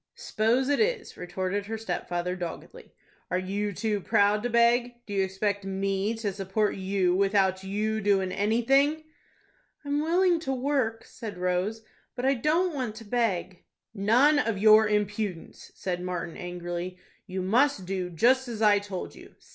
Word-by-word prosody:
"S'pose 235 +5 0
it 285 0 +1
is," 450 -1 0
retorted 185 +3 -3
her 225 +1 -3
stepfather, 180 -3 -3
doggedly. 175 -2 -8 0.4
"Are 180 - 0
you 200 +3 -2
too 210 +1 -2
proud 205 +3 +3
to 245 - -2
beg? 235 +1 +3
Do 205 - -7
you 195 -1 +2
expect 200 +1 -2
me 195 +2 -1
to 215 -3 -3
support 195 +2 -1
you 190 -1 0
without 195 -1 +2
you 215 +3 -1
doin' 195 -2 +2
anything?" 270 +10 +2 0.8
"I'm 285 +1 0
willing 345 +2 +3
to 270 -5 -2
work," 255 -4 -1
said 220 -6 -8
Rose, 180 +5 -1 0.3
"but 250 0 -3
I 270 - +4
don't 315 +8 +1
want 250 -6 -3
to 225 0 -10
beg." 200 -6 -1 0.3
"None 240 +9 +4
of 225 -7 0
your 215 +1 +6
impudence!" 210 -3 -3
said 180 -2 -3
Martin, 175 -2 -4
angrily. 175 0 -5 0.3
"You 185 -1 -3
must 230 +1 +2
do 185 -1 -3
just 250 +10 +3
as 230 -3 -5
I 210 -2 +5
told 200 -3 -6
you. - - -15
205 Hz, 155 wpm, -27 LUFS, 190-240 Hz, 0.8 s, your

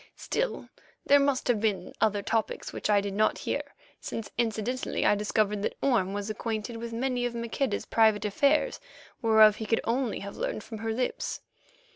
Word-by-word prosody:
Still, - - -2 0.4
there 285 0 +6
must 280 -2 +1
have 240 -4 +2
been 205 -5 -1
other 210 -2 +2
topics 225 +1 -2
which - - -3
I 205 -1 +5
did 200 -1 -4
not 215 +2 +2
hear, - - -2 0.4
since 225 - -6
incidently 235 +2 -1
I - - +5
discovered 210 0 0
that - - -2
Orme 225 -9 +2
was 205 0 -3
acquainted 220 +1 -3
with 230 0 -6
many 250 +1 -1
of 240 - -7
Maqueda's 235 0 -2
private 220 -2 +3
affairs 280 +9 +2 0.4
whereof 220 -2 +6
he 220 - -5
could 225 - +2
only 240 -1 -1
have 200 0 -7
learned 215 - -3
from 220 -3 -8
her 225 +1 -2
lips. 250 +3 -2
225 Hz, 175 wpm, -28 LUFS, 210-240 Hz, 0.4 s, there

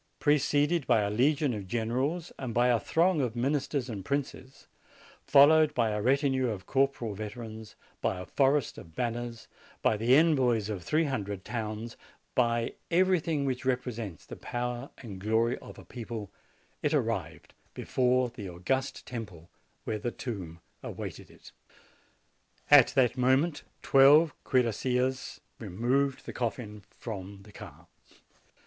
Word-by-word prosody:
Preceded 145 0 +2
by 115 -4 +4
a 100 0 -1
legion 140 +4 +2
of 100 -3 -6
generals 130 - -2
and 125 -4 -5
by 120 +1 +4
a 120 -2 +3
throng 170 +3 +2
of 125 -3 -2
ministers 135 +1 -1
and 105 -6 -6
princes, 135 +1 -4 0.6
followed 150 +2 +6
by 115 -3 +2
a 105 0 -2
retinue 130 +1 +2
of 100 -4 -5
corporal 135 -5 0
veterans, 110 +1 -8 0.3
by 95 - -1
a 90 - -6
forest 140 -2 +1
of 80 -1 -14
banners, 120 -1 -4 0.4
by - - +3
the 120 +4 +4
envoys 130 -9 +3
of 100 -4 -4
three 155 - +1
hundred 105 - -3
towns, 110 0 -5 0.4
by 115 -2 +1 0.2
everything 170 -4 +2
which 130 -2 -2
represents 120 - -3
the - - -9
power 120 +2 -4
and 100 -6 -9
glory 115 +4 +1
of - - -12
a - - -12
people, 115 -5 -7 0.5
it - - +1
arrived - - -2 0.2
before 125 0 +1
the 100 -5 -7
august 130 +11 -2
temple 100 -9 -8 0.3
where 110 - -3
the 120 - -2
tomb 95 -10 -7 0.2
awaited - - -7
it. - - -16 1.2
"At 145 -4 +9
that 130 -2 +3
moment 135 +6 +2 0.2
twelve 145 +4 +6
cuirassiers 125 +1 0 0.2
removed 125 +7 -1
the - - -7
coffin 110 -3 -4
from 100 -3 -8
the 105 - -15
car. - - -12
125 Hz, 140 wpm, -29 LUFS, 110-135 Hz, 1.2 s, At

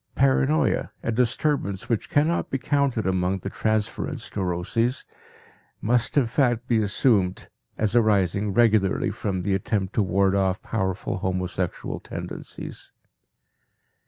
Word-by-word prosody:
Paranoia, 65 +3 +2
a 115 - 0
disturbance 115 -3 0
which 115 -4 -1
cannot 155 +4 +1
be 135 - -1
counted 135 -4 0
among 95 0 +1
the 100 +1 -6
transference 110 -1 -2
neuroses, 100 +7 -1 0.7
must 120 +5 +1
in 140 - +5
fact 120 -1 +1
be 115 -2 +3
assumed 105 -3 +1 0.3
as 110 +1 0
arising 100 -3 +2
regularly 110 -3 +3
from 95 -3 -3
the 100 - 0
attempt 95 0 -1
to - - +2
ward 95 0 +2
off 95 0 +1
powerful 95 -3 -2
homosexual 90 -1 -2
tendencies. - - -8
105 Hz, 120 wpm, -25 LUFS, 95-120 Hz, 0.7 s, in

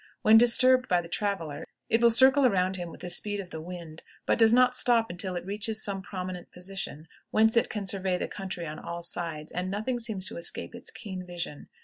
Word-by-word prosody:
When 215 - +7
disturbed 255 +1 +5
by 180 -5 +3
the 170 - -6
traveler, 175 -5 -3 0.2
it 225 - +2
will 235 - +7
circle 265 +4 +6
around 190 -6 +2
him 175 -2 -5
with - - -12
the 180 - -5
speed 205 +2 -1
of 185 -3 -7
the 160 - -6
wind, 170 -2 -8 0.2
but - - +1
does 225 -1 +6
not 250 +1 +5
stop 235 -4 +3
until 180 +1 -3
it 175 - -4
reaches 210 +2 -2
some 195 -1 -2
prominent 185 -2 -6
position 180 -4 -6 0.2
whence 220 +1 +3
it 230 - +3
can 210 -2 -4
survey 190 -1 0
the - - -3
country 190 -3 -5
on 155 -1 -6
all 170 0 -6
sides, 165 -3 -4
and 180 +1 -3
nothing 220 +5 -2
seems 220 -5 -3
to - - -8
escape 170 - -3
its 235 +2 -4
keen 190 -5 -7
vision. 175 -4 -6
190 Hz, 220 wpm, -28 LUFS, 175-225 Hz, 0.2 s, When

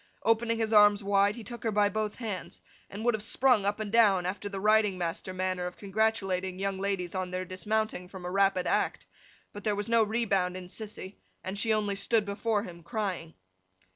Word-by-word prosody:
Opening 230 0 +2
his 225 -1 -1
arms 210 -1 +6
wide 200 +1 +3
he 235 - -8
took 235 +3 -8
her 225 - 0
by 205 0 +3
both 215 0 -2
her 240 - -8
hands, 200 -4 -5 0.3
and 210 +3 -6
would 240 - +4
have 220 - -2
sprung 245 +1 +3
her 195 - -2
up 205 +1 -1
and 210 -2 -4
down, 205 -6 +4
after 200 +3 -3
the 195 -1 -5
riding 210 -1 +3
master 175 +1 -3
manner 185 -1 -2
of 180 - -9
congratulating 195 -3 -1
young 195 0 -2
ladies 190 -3 -2
on 185 -1 -2
their 185 +1 -3
dismounting 190 +1 -2
from 185 -1 -10
a 180 - -3
rapid 195 -1 +2
act; - - 0 0.5
but 205 - -8
there 210 -2 +1
was 205 0 -3
no 230 0 +4
rebound 205 -5 +1
in 180 -1 -9
Sissy, 205 -2 -6 0.3
and 190 - -4
she 225 +1 +1
only 210 -2 +1
stood 210 +2 +1
before 205 +1 -1
him 170 -4 -10
crying. 185 -4 -4
205 Hz, 210 wpm, -29 LUFS, 185-220 Hz, 0.5 s, arms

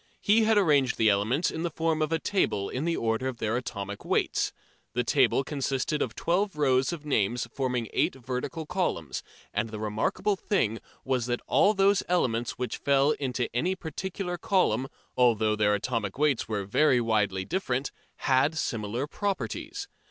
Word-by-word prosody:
He 220 +2 +4
had 220 -1 +4
arranged 145 -9 +3
the 110 -1 +5
elements 110 - +1
in 160 - -4
the 170 - -1
form 160 0 0
of 155 0 0
a 165 - +3
table 160 - 0
in 130 +5 -3
the 170 0 0
order 115 +3 0
of 130 -2 -4
their 110 0 -1
atomic 100 -5 -5
weights. - - 0 0.4
The - - +1
table 135 - +3
consisted 140 +1 -1
of 115 -2 -2
twelve 190 +3 0
rows 135 -2 +2
of 160 -3 -6
names 120 -3 0
forming 125 -4 -1
eight - - +1
vertical 130 +5 -4
columns, 85 - -2 0.3
and 115 - -1
the 110 - -6
remarkable 110 - 0
thing 115 - 0 0.3
was 130 -3 0
that 120 0 -2
all 210 +2 +4
those 195 0 +4
elements 120 -9 +1
which 125 -3 -3
fell 140 +1 +3
into 130 -4 -1
any 175 +10 +1
particular 180 +2 -5
column, 135 - +2 0.3
although 110 -4 +3
their 105 -1 +3
atomic 105 -2 -2
weights 145 -4 +1
were 105 -3 -2
very 125 +5 +3
widely 105 -5 +1
different, 135 - -1 0.2
had 140 +4 +2
similar 115 -1 -2
properties. 310 - -3
130 Hz, 165 wpm, -28 LUFS, 115-165 Hz, 0.4 s, the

